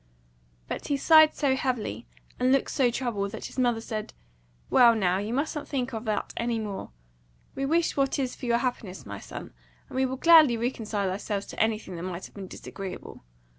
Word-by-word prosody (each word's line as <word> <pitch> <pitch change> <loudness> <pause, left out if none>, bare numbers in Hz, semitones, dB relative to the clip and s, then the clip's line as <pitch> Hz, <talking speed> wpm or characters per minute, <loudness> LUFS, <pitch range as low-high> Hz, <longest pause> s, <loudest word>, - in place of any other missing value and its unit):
But - - -5
he 285 - +1
sighed 315 +1 +6
so 275 -3 +2
heavily, 255 - -2 0.3
and 255 +1 +3
looked 275 0 +2
so 255 -3 +3
troubled, 230 -5 -2
that 220 - -6
his - - -6
mother 240 -3 +2
said, 215 -2 -5 0.5
"Well, 235 -2 +6
now, 190 -3 +1
you 205 +2 -3
mustn't 295 +4 -2
think 260 -2 -2
of 225 +1 -5
that 215 -1 -2
any 235 0 -1
more. 210 -3 -5 0.6
We 275 0 -2
wish 330 +3 +1
what 275 -1 +1
is 260 -3 -2
for 250 - -7
your 235 0 +3
happiness, 235 -6 -3
my 100 -1 -7
son, - - -9 0.4
and - - -10
we 260 0 +2
will 260 +1 -4
gladly 310 -5 +7
reconcile 220 -5 -2
ourselves 200 +1 -3
to - - -9
anything 215 -5 -1
that - - -6
might 180 0 -5
have - - -13
been 195 -2 -8
disagreeable. 190 0 -8
235 Hz, 195 wpm, -27 LUFS, 205-265 Hz, 0.6 s, gladly